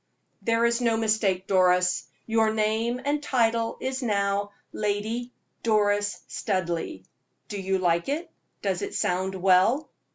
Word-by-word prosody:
"There 230 0 +2
is 235 +1 +2
no 230 -2 +2
mistake, 215 -4 +1
Doris; 180 -1 +3 0.2
your 225 -1 +2
name 220 +3 0
and 290 +1 +1
title 230 -4 +1
is 260 +1 -3
now 200 -3 0 0.2
Lady 215 +4 -2 0.3
Doris 205 -2 +1
Studleigh. 170 - -2 0.5
Do 205 -2 -4
you 190 0 0
like 170 +2 +1
it? 315 +5 -3 0.3
Does - - 0
it 405 0 -4
sound 185 +2 0
well?" 190 - +3
215 Hz, 130 wpm, -26 LUFS, 190-235 Hz, 0.5 s, Doris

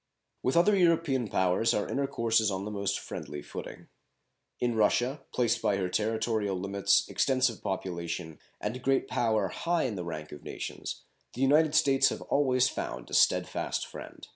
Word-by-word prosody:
With 130 +5 +1
other 205 +4 +5
European 165 - +2
powers 95 +4 +2
our 105 - -1
intercourse 115 -5 +1
is 110 - +2
on 95 0 -3
the 105 - -4
most 100 -1 -1
friendly 75 0 -7
footing. - - -8 0.7
In 120 -1 +1
Russia, 120 +6 +1
placed 120 -2 +1
by 100 - +1
her 95 -2 -1
territorial 110 -2 0
limits, 100 +1 +2
extensive 130 -3 +1
population, 85 -3 -4 0.2
and 120 +5 -4
great 135 +1 +1
power 110 -5 +1
high 170 - 0
in 125 - -1
the 90 -3 -4
rank 80 -2 -6
of 75 - -9
nations, - - -6 0.3
the 125 - -5
United 150 +3 +4
States 135 -2 +4
have - - -5
always 130 -3 +2
found - - -5
a - - -9
steadfast - - +2
friend. - - -10
115 Hz, 165 wpm, -29 LUFS, 100-135 Hz, 0.7 s, other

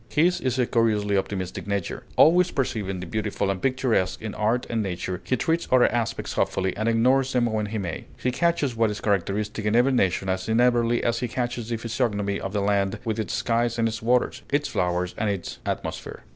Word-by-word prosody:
His 175 +4 +2
is 130 -1 0
a 125 - +3
curiously 105 -4 +1
optimistic 95 -1 -3
nature. 100 -3 -2
Always 180 +3 +6
perceiving 100 -8 -2
the - - -5
beautiful 100 +1 -1
and 95 - -4
picturesque 125 -8 +1
in 110 -1 -5
art 115 +3 0
and 115 -1 -1
nature, 90 -2 -3
he 130 - 0
treats 165 +6 0
other 130 -1 +6
aspects 120 -3 -2
hopefully, 95 -1 0
and 110 +2 0
ignores 130 +4 +3
them 125 -2 +3
when 110 -2 -1
he 110 +2 -4
may. 90 -5 -4
He 125 - -1
catches 145 -3 +1
what 115 -1 +2
is 105 -1 -4
characteristic 100 +2 -1
in 105 +1 +1
every 125 +3 +4
nation 95 -6 +1
as 95 +2 -2
inevitably 120 0 +3
as 115 0 +1
he 125 - -1
catches 120 -1 -3
the 115 - -1
physiognomy 110 -4 -1
of 95 +2 -5
a 100 - +1
land 100 -1 +1
with 110 -1 -1
its 110 - -2
skies 115 +1 0
and 115 -1 +2
its 110 -1 -4
waters, 120 +2 +1
its 145 +1 +1
flowers 90 0 -1
and 110 0 +1
its 100 -3 -4
atmosphere. - - -4
110 Hz, 205 wpm, -25 LUFS, 100-125 Hz, -, Always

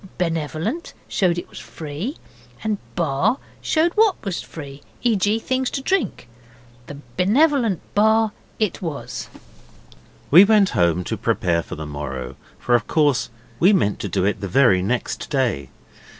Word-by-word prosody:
'Benevolent' 165 - -2
showed 180 -3 +1
it 175 - -5
was - - -11
free 160 - -6 0.5
and 215 -2 -1 0.2
'Bar' 170 - +1 0.2
showed 330 +2 +2
what 430 -2 +4
was 195 -3 -2
free; 140 -3 -9 0.2
e.g. 215 -2 +2
things 260 +2 -1
to - - -3
drink. 350 - -1 0.6
The 145 - -8 0.2
'Benevolent 235 - +3
Bar' 220 +1 +3 0.3
it 215 -5 -1
was. 160 -6 -5 1.0
We 175 +6 +10
went 205 -2 +4
home 85 -1 +3
at 85 - -1
once 90 0 -4
to - - -2
prepare 85 -2 +1
for - - -8
the 80 - -6
morrow, 70 -4 -5 0.2
for 120 - -1
of 120 -3 +3
course 150 -5 +2 0.3
we 190 +4 +6
meant 105 - +1
to 100 - -4
do 90 - 0
it 105 - 0
the 100 - -3
very 95 -3 +4
next 120 +6 -2
day. 120 - 0
170 Hz, 155 wpm, -22 LUFS, -, 1.0 s, We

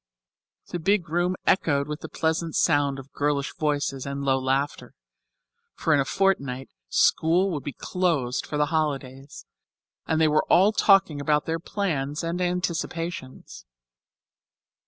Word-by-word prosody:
The 175 - -4
big 185 -1 +1
room 175 +3 0
echoed 140 -6 +2
with 150 0 -5
the - - -8
pleasant 160 0 -1
sound 145 -4 +2
of 135 0 -11
girlish 145 -1 -1
voices 145 -3 -1
and 140 0 -4
low 135 -1 +2
laughter, 135 +3 -2 0.8
for 160 - +1
in 145 - +4
a 135 - +1
fortnight 140 -9 0 0.2
school 175 - +3
would 145 -3 -4
close 160 -9 0
for 150 - -5
the 150 - +3
holidays, 140 -3 -3 0.6
and 160 - +1
they 160 - +4
were 155 0 +3
all 195 +4 +5
talking 195 -9 +3
about 150 +1 +1
their 165 0 -2
plans 155 -6 -2
and 170 +2 -2
anticipations. 170 - -4
150 Hz, 135 wpm, -25 LUFS, 140-175 Hz, 0.8 s, all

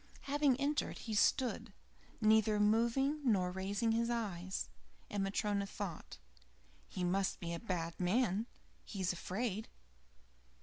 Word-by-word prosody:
Having 280 -2 +2
entered, 290 +2 0
he 225 - -5
stood, 240 +4 +2 0.5
neither 215 -1 +4
moving, 235 +8 +3
nor 190 -8 +2
raising 200 +4 0
his 230 +1 +1
eyes, 190 -6 -2 0.4
and 205 -1 0
Matryona 200 0 0
thought: 195 -5 -6 0.7
"He 185 - -4
must 190 +2 +1
be 170 -1 -4
a 170 - -3
bad 170 -6 -3
man 210 +3 +2 0.4
he's 190 -3 -2
afraid." 205 +4 -3
210 Hz, 120 wpm, -36 LUFS, 190-235 Hz, 0.7 s, neither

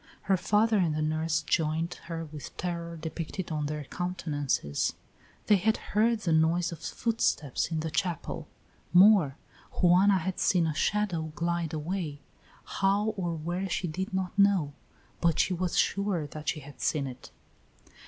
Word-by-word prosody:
Her 195 - +3
father 210 +4 +2
and 165 -4 +1
the 155 - -1
nurse 155 0 0
joined 160 +2 0
her 165 -1 -4
with 150 -2 -10
terror 170 -1 -4
depicted 165 +3 -5
on 150 -2 -1
their 150 0 -4
countenances; 145 - -2 0.5
they 210 - +5
had 220 +4 +2 0.2
heard 220 +2 +3
the 170 - 0
noise 165 +2 +2
of 170 - -7
footsteps 225 - 0
in 160 -2 -1
the 160 0 -3
chapel; 170 0 -2 0.5
more, 180 -7 +6 0.4
Juana 190 +2 +5
had 185 +1 -3
seen 175 -3 +3
a 160 - 0
shadow 170 -3 0
glide 170 -1 -1
away; 155 -1 -3 0.4
how 200 +2 +1
or 180 -6 -2
where 175 +5 -3
she 180 - -1
did 185 +4 -4
not 190 -1 -2
know, 195 -8 +4 0.5
but 170 -2 +3
she 185 - +2
was 180 0 -1
sure 200 -5 +1
that 150 +1 -5
she 155 - -2
had 145 +1 -12
seen 145 -3 +1
it. 130 -1 -9
170 Hz, 155 wpm, -29 LUFS, 155-190 Hz, 0.5 s, more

